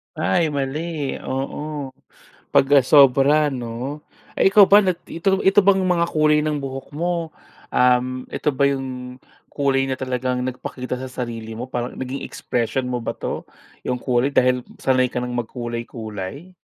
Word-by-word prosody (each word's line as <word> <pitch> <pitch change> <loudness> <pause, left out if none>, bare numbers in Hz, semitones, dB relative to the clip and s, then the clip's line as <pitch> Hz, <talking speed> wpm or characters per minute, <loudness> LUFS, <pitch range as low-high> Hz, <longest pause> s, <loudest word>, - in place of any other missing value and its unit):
Ay, 165 +1 +1
mali 145 +1 -3
oo 140 +1 -4 0.6
pag, - - +5
ah, 140 - +7
sobra 140 +2 +5
'no. 125 +4 -5 0.3
Eh, - - +4
ikaw 200 0 +8
ba 205 +1 +7
nag 185 -3 +1
ito 190 +3 0
ito 195 +2 +6
bang 195 0 +4
mga 175 -2 +2
kulay 150 -1 +3
ng 150 -1 0
buhok 135 -1 -6
mo, 170 0 -1 0.4
um, 125 0 +2
ito - - -1
ba 140 +1 +2
yung 130 -2 -4 0.3
kulay 135 -2 +1
na 135 - -1
talagang 125 -1 -1
nagpakita 125 0 -4
sa 130 0 -7
sarili 115 -3 -5
mo, 120 +3 -6
parang 120 -1 -3
naging 130 +1 -4
expression 125 +2 -2
mo 125 - -1
ba 115 - -3
'to - - -5 0.4
yung 125 -1 -2
kulay 125 +2 +1
dahil 125 -1 +2 0.2
sanay 130 -1 +3
ka 125 - -1
ng 125 0 -4
magkulay-kulay? 120 - -6
130 Hz, 155 wpm, -22 LUFS, 125-150 Hz, 0.6 s, ikaw